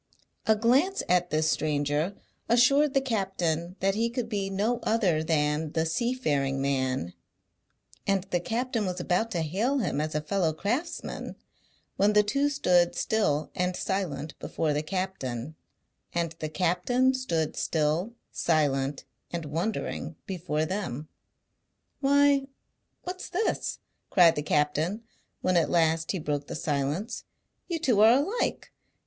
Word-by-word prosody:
A 220 Hz, -, +6 dB
glance 265 Hz, -, +2 dB
at 180 Hz, 0 st, +2 dB
this 155 Hz, 0 st, +1 dB
stranger 150 Hz, +4 st, 0 dB, 0.3 s
assured 275 Hz, +5 st, +4 dB
the 270 Hz, -, +4 dB
captain 185 Hz, -8 st, -1 dB
that 195 Hz, +1 st, +2 dB
he 230 Hz, +3 st, +1 dB
could 235 Hz, -1 st, -3 dB
be 200 Hz, -3 st, -1 dB
no 210 Hz, +5 st, 0 dB
other 190 Hz, -9 st, +2 dB
than 150 Hz, -1 st, 0 dB
the 160 Hz, 0 st, +1 dB
Seafaring 160 Hz, -, 0 dB
Man; 130 Hz, -7 st, -1 dB, 0.9 s
and 195 Hz, -2 st, +2 dB
the 175 Hz, -, +2 dB
captain 230 Hz, +2 st, -1 dB
was 180 Hz, -1 st, -3 dB
about 200 Hz, +6 st, 0 dB
to 175 Hz, -7 st, -1 dB
hail 210 Hz, -, 0 dB
him 180 Hz, -, 0 dB
as 155 Hz, 0 st, -3 dB
a 150 Hz, -, +1 dB
fellow 165 Hz, 0 st, 0 dB
craftsman, 240 Hz, -, -3 dB, 0.6 s
when 205 Hz, +2 st, +4 dB
the 210 Hz, 0 st, +6 dB
two 275 Hz, +8 st, +1 dB
stood 180 Hz, -12 st, +3 dB
still 155 Hz, -9 st, 0 dB
and 180 Hz, 0 st, -1 dB
silent 160 Hz, -8 st, -2 dB
before 155 Hz, -2 st, -1 dB
the 145 Hz, -, 0 dB
captain, 155 Hz, -7 st, -3 dB, 0.6 s
and 170 Hz, -2 st, 0 dB
the 155 Hz, -, -3 dB
captain 185 Hz, +10 st, +2 dB
stood 170 Hz, -, -1 dB
still, 160 Hz, +8 st, 0 dB, 0.2 s
silent, 145 Hz, -4 st, 0 dB, 0.3 s
and 170 Hz, -2 st, -3 dB
wondering 165 Hz, +1 st, -3 dB
before 165 Hz, -5 st, -2 dB
them. 155 Hz, -6 st, -4 dB, 0.9 s
"Why, 280 Hz, 0 st, +4 dB, 0.6 s
what's 365 Hz, +1 st, -6 dB
this?" 415 Hz, +5 st, -1 dB, 0.3 s
cried 175 Hz, -3 st, +6 dB
the 150 Hz, -, -1 dB
captain, 150 Hz, +8 st, 0 dB, 0.4 s
when 185 Hz, 0 st, +1 dB
at 170 Hz, -2 st, +3 dB
last 165 Hz, -1 st, +2 dB
he 195 Hz, -, -2 dB
broke 145 Hz, -3 st, -2 dB
the -, -, -5 dB
silence. 150 Hz, -, -2 dB, 0.4 s
"You 340 Hz, -, -1 dB
two 250 Hz, -10 st, +2 dB
are 220 Hz, +2 st, +8 dB
alike. 310 Hz, -, 0 dB
180 Hz, 140 wpm, -28 LUFS, 155-230 Hz, 0.9 s, are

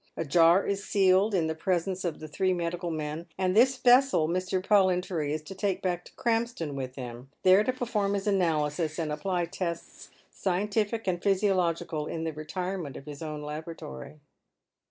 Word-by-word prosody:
A 165 Hz, -, -2 dB
jar 170 Hz, +5 st, +5 dB
is 200 Hz, 0 st, -2 dB
sealed 195 Hz, +1 st, +3 dB
in 170 Hz, -3 st, +2 dB
the 160 Hz, -, -1 dB
presence 185 Hz, +3 st, -1 dB
of 170 Hz, -3 st, -3 dB
the 155 Hz, -, -7 dB
three 185 Hz, +4 st, 0 dB
medical 175 Hz, 0 st, -2 dB
men, 155 Hz, +1 st, -4 dB
and 185 Hz, 0 st, +1 dB
this 255 Hz, +4 st, +5 dB
vessel 250 Hz, -, +5 dB
Mr. 185 Hz, +2 st, -1 dB
Pollintory 185 Hz, -6 st, +2 dB
is 155 Hz, 0 st, -3 dB
to 155 Hz, -, -8 dB
take 195 Hz, -1 st, -2 dB
back 175 Hz, -2 st, -1 dB
to -, -, -14 dB
Krampston 230 Hz, -10 st, -1 dB
with 130 Hz, -2 st, -5 dB
him, 125 Hz, 0 st, -8 dB
there 185 Hz, +2 st, +6 dB
to 255 Hz, -, +1 dB
perform 215 Hz, -5 st, -1 dB
his 195 Hz, -, -3 dB
analysis, 160 Hz, -5 st, 0 dB
and 160 Hz, -3 st, -2 dB
apply 175 Hz, +3 st, -1 dB
tests 170 Hz, -1 st, -5 dB, 0.2 s
scientific 210 Hz, +4 st, -1 dB
and 175 Hz, -2 st, -1 dB
physiological, 175 Hz, -5 st, +1 dB
in 165 Hz, -, -4 dB
the 160 Hz, -1 st, -2 dB
retirement 165 Hz, 0 st, -4 dB
of 140 Hz, -, -11 dB
his 145 Hz, 0 st, -9 dB
own 155 Hz, -2 st, -5 dB
laboratory. 150 Hz, -, -7 dB
175 Hz, 175 wpm, -28 LUFS, 155-195 Hz, 0.2 s, there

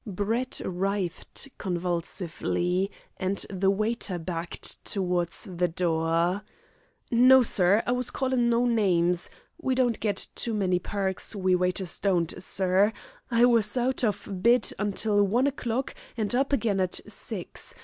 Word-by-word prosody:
Brett 215 Hz, +6 st, -2 dB
writhed 190 Hz, +5 st, -3 dB
convulsively, 180 Hz, +1 st, -1 dB, 0.3 s
and 190 Hz, +1 st, -2 dB
the 190 Hz, 0 st, +1 dB
waiter 210 Hz, -1 st, -1 dB
backed 170 Hz, 0 st, -4 dB
towards 180 Hz, -3 st, -1 dB
the 180 Hz, -4 st, -1 dB
door. 170 Hz, +2 st, 0 dB, 0.7 s
"No, 255 Hz, +2 st, +7 dB
sir, 200 Hz, 0 st, +4 dB
I -, -, 0 dB
was 250 Hz, 0 st, 0 dB
callin' 255 Hz, -3 st, +1 dB
no 235 Hz, +1 st, +3 dB
names. 180 Hz, -7 st, +2 dB, 0.3 s
We 260 Hz, -4 st, 0 dB
don't 245 Hz, -3 st, +1 dB
get 205 Hz, -2 st, 0 dB
too 230 Hz, -2 st, -2 dB
many 185 Hz, -3 st, +1 dB
perks 195 Hz, +2 st, -3 dB
we 185 Hz, -2 st, +1 dB
waiters 180 Hz, 0 st, 0 dB
don't, 175 Hz, -5 st, +1 dB
sir. 190 Hz, +3 st, +3 dB, 0.4 s
I 235 Hz, 0 st, +5 dB
was 230 Hz, -2 st, +3 dB
out 255 Hz, +1 st, 0 dB
of 210 Hz, -3 st, -1 dB
bed 235 Hz, 0 st, +4 dB
until 205 Hz, +1 st, +1 dB
one 230 Hz, +7 st, +2 dB
o'clock 260 Hz, -2 st, -2 dB, 0.2 s
and 215 Hz, 0 st, 0 dB
up 270 Hz, +3 st, +1 dB
again 215 Hz, -7 st, +1 dB
at 185 Hz, -1 st, 0 dB
six. -, -, -6 dB
200 Hz, 135 wpm, -27 LUFS, 180-235 Hz, 0.7 s, No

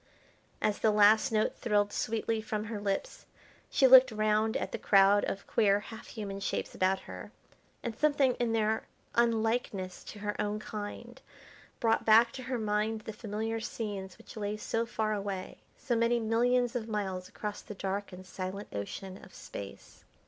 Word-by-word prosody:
As 210 Hz, -1 st, +1 dB
the 220 Hz, -, +3 dB
last 215 Hz, +4 st, +5 dB
note 215 Hz, -1 st, +1 dB
thrilled 205 Hz, -3 st, +1 dB
sweetly 225 Hz, 0 st, -1 dB
from 215 Hz, -1 st, -3 dB
her 215 Hz, -1 st, -5 dB
lips 200 Hz, -1 st, -3 dB, 0.4 s
she 270 Hz, -, +3 dB
looked 260 Hz, -1 st, +9 dB
round 215 Hz, 0 st, +1 dB
at -, -, -4 dB
the -, -, -4 dB
crowd 200 Hz, 0 st, +5 dB
of 195 Hz, -, -4 dB
queer 205 Hz, -2 st, +3 dB
half 220 Hz, +2 st, -10 dB
human 200 Hz, -3 st, -6 dB
shapes 195 Hz, -, -3 dB
about 190 Hz, +1 st, +1 dB
her, -, -, -9 dB, 0.5 s
and 235 Hz, -2 st, -3 dB
something 285 Hz, -2 st, +3 dB
in 240 Hz, -2 st, +1 dB
their 220 Hz, -1 st, 0 dB, 0.3 s
unlikeness 225 Hz, -5 st, 0 dB
to -, -, -9 dB
her 205 Hz, 0 st, -3 dB
own 210 Hz, 0 st, -1 dB
kind 215 Hz, +4 st, -7 dB, 0.6 s
brought 225 Hz, -1 st, +2 dB
back 225 Hz, +2 st, +6 dB
to 260 Hz, -, -7 dB
her 255 Hz, 0 st, -3 dB
mind 215 Hz, 0 st, 0 dB
the 220 Hz, -, -7 dB
familiar 220 Hz, +1 st, -3 dB
scenes 205 Hz, -4 st, -5 dB
which -, -, -13 dB
lay 210 Hz, -1 st, -3 dB
so 225 Hz, +2 st, -1 dB
far 220 Hz, -2 st, -1 dB
away, 200 Hz, -2 st, -4 dB, 0.2 s
so 255 Hz, -4 st, -1 dB
many 235 Hz, +1 st, +2 dB
millions 240 Hz, +2 st, +2 dB
of 230 Hz, -2 st, -2 dB
miles 190 Hz, -4 st, -3 dB
across 210 Hz, -1 st, -5 dB
the 210 Hz, -, -9 dB
dark 195 Hz, +1 st, -3 dB
and 185 Hz, 0 st, -10 dB
silent 185 Hz, +2 st, -6 dB
Ocean 185 Hz, -, -6 dB
of 190 Hz, -, -14 dB
Space. 100 Hz, -, -10 dB
215 Hz, 170 wpm, -31 LUFS, 205-230 Hz, 0.6 s, looked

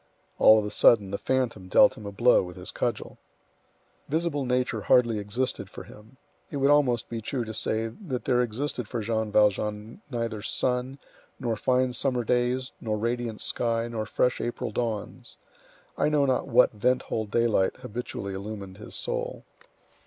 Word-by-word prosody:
All 110 Hz, -, +8 dB
of 105 Hz, -, 0 dB
a 105 Hz, -, -4 dB
sudden 100 Hz, -4 st, +4 dB
the 100 Hz, -, -3 dB
phantom 125 Hz, -8 st, -1 dB
dealt -, -, +5 dB
him 105 Hz, -, -9 dB
a -, -, -5 dB
blow 120 Hz, +5 st, +4 dB
with 90 Hz, -1 st, -7 dB
his 90 Hz, -1 st, -7 dB
cudgel. -, -, -3 dB, 0.9 s
Visible 155 Hz, -2 st, -1 dB
nature 125 Hz, -3 st, 0 dB
hardly 120 Hz, -1 st, +3 dB
existed 105 Hz, +6 st, -2 dB
for -, -, -9 dB
him. 110 Hz, +5 st, -16 dB, 0.3 s
It 145 Hz, -, -4 dB
would 140 Hz, +1 st, +3 dB
almost 130 Hz, -6 st, +3 dB
be 115 Hz, -1 st, -5 dB
true 120 Hz, +2 st, -3 dB
to 110 Hz, -, -6 dB
say 110 Hz, +1 st, -1 dB
that 130 Hz, -, -6 dB
there 125 Hz, -1 st, +3 dB
existed 125 Hz, 0 st, -3 dB
for 120 Hz, 0 st, -3 dB
Jean 110 Hz, 0 st, -1 dB
Valjean 105 Hz, -, +1 dB
neither 115 Hz, -4 st, -3 dB
sun, 125 Hz, +4 st, -1 dB, 0.4 s
nor 115 Hz, -2 st, -1 dB
fine 125 Hz, +3 st, +1 dB
summer 125 Hz, 0 st, 0 dB
days, 125 Hz, +2 st, 0 dB
nor 110 Hz, -2 st, -1 dB
radiant 115 Hz, 0 st, -2 dB
sky, 115 Hz, -1 st, 0 dB
nor 110 Hz, -2 st, -4 dB
fresh 125 Hz, +2 st, +1 dB
April 120 Hz, -, -3 dB
dawns. 115 Hz, -4 st, -4 dB, 0.6 s
I -, -, +3 dB
know 150 Hz, -2 st, +3 dB
not 130 Hz, -2 st, 0 dB
what 125 Hz, -1 st, +5 dB
vent 125 Hz, +4 st, +1 dB
hole 110 Hz, -1 st, -3 dB
daylight 110 Hz, -3 st, +2 dB
habitually 105 Hz, -3 st, -6 dB
illumined 100 Hz, -1 st, -7 dB
his 105 Hz, -, -7 dB
soul. -, -, -3 dB
115 Hz, 165 wpm, -27 LUFS, 105-125 Hz, 0.9 s, All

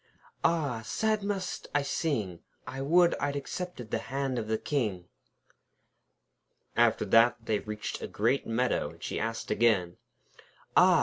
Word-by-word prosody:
'Ah! 145 Hz, -9 st, +1 dB
sad 215 Hz, -, 0 dB
must 195 Hz, -2 st, -3 dB
I 145 Hz, -, +3 dB
sing! 110 Hz, -, -1 dB, 0.3 s
I 135 Hz, +1 st, -5 dB
would 170 Hz, +5 st, +5 dB
I'd 145 Hz, 0 st, -1 dB
accepted 140 Hz, -, -5 dB
the -, -, +1 dB
hand 135 Hz, -2 st, -1 dB
of 110 Hz, -, -4 dB
the 110 Hz, 0 st, +1 dB
King.' 110 Hz, -11 st, -1 dB, 1.7 s
After 120 Hz, -2 st, +3 dB
that 115 Hz, +2 st, +4 dB
they 105 Hz, -2 st, +1 dB
reached 105 Hz, 0 st, -5 dB
a -, -, -3 dB
great 120 Hz, +6 st, 0 dB
meadow, 120 Hz, +3 st, +1 dB
and -, -, -14 dB
she -, -, -2 dB
asked 115 Hz, +1 st, -3 dB
again: 95 Hz, -7 st, +2 dB, 0.8 s
'Ah! -, -, +7 dB
120 Hz, 140 wpm, -29 LUFS, 110-145 Hz, 1.7 s, Ah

